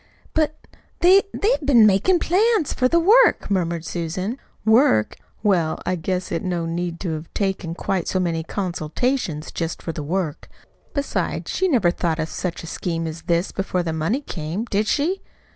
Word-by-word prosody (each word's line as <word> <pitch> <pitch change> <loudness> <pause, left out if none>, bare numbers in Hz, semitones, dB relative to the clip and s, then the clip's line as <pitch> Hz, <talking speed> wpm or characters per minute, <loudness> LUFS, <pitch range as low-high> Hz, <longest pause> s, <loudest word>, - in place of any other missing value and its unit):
"But, 310 -1 +1 0.4
they 370 +3 +7
they've 435 -4 +1
been 250 -6 +6
makin' 210 - +4
plans 390 - +2
for - - -13
for 255 - +5
the 340 +6 +3
work," 425 - +5
murmured 170 -3 0
Susan. 185 +8 -3 0.3
"Work! 220 - +4 0.3
Well, 175 -7 +2
I 185 - 0
guess 180 +2 -3
it 165 - -1
no 175 -3 -2
need 170 0 -3
to've 160 -3 -4
taken 190 -4 -1
quite 185 -1 -2
so 185 - 0
many 170 -3 0
consultations 175 - -2
for - - -26
just 165 -1 -3
the 160 -2 -3
work. 165 0 -3 0.5
Besides, 285 -1 -2
she 380 - +1
never 230 - +3
thought 170 -2 -1
of 160 0 -2
such 180 -2 -4
a - - -6
scheme 165 0 -3
as 160 +1 -5
this 170 +2 0
before 185 -2 -1
the 165 -2 -2
money 165 - 0
came, 175 - -4
did 210 -1 0
she? 340 +7 0
185 Hz, 175 wpm, -22 LUFS, 165-255 Hz, 0.5 s, they